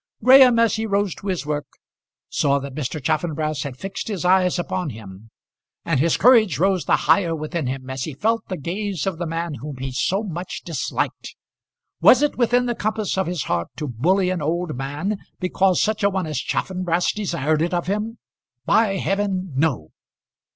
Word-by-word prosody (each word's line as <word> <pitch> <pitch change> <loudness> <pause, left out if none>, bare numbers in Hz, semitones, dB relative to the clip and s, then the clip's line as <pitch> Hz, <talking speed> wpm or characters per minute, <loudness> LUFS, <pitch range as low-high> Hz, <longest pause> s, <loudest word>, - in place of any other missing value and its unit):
Graham, 255 -1 +8
as 230 -1 +3
he 220 0 -2
rose 200 -2 0
to 200 - -10
his 185 -5 -2
work, 150 -2 -3 0.6
saw 140 -1 +1
that 140 -1 -6
Mr. 150 +1 -3
Chaffanbrass 155 +1 -1
had 135 -3 -5
fixed 195 - -6
his 195 -6 -3
eye 185 0 +4
upon 180 -1 -2
him, 110 -2 -11 0.6
and 160 -6 +1
his 160 +3 +2
courage 225 - +5
rose 190 0 +1
the - - +4
higher 165 +1 +3
within 155 -1 -3
him 130 0 -4
as 130 0 -4
he 155 - -6
felt 225 +8 0
the 185 - -4
gaze 190 +3 -3
of 190 -4 -2
the 175 - -2
man 165 0 -3
whom 145 0 -6
he 130 +1 -4
so 190 +10 0
much 180 -2 -5
disliked. 165 -6 -3 0.7
Was 260 +3 +7
it 295 - +1
within 245 0 +2
the 240 - 0
compass 215 -2 -2
of 190 -2 0
his 175 -3 -2
heart 85 -1 -1
to 150 - -4
bully 180 - +1
an 180 -3 -2
old 165 +1 -2
man 145 +10 -3 0.2
because 185 0 +2
such 215 -1 0
a 200 - +4
one 190 -3 -2
as 155 -4 -3
Chaffanbrass 180 +2 -1
desired 155 -7 -1
it 170 - 0
of 175 -1 -1
him? 210 +5 -2 0.5
By 215 -3 +3
heaven, 190 -4 -1
no! 135 - 0
175 Hz, 185 wpm, -22 LUFS, 150-200 Hz, 0.7 s, Graham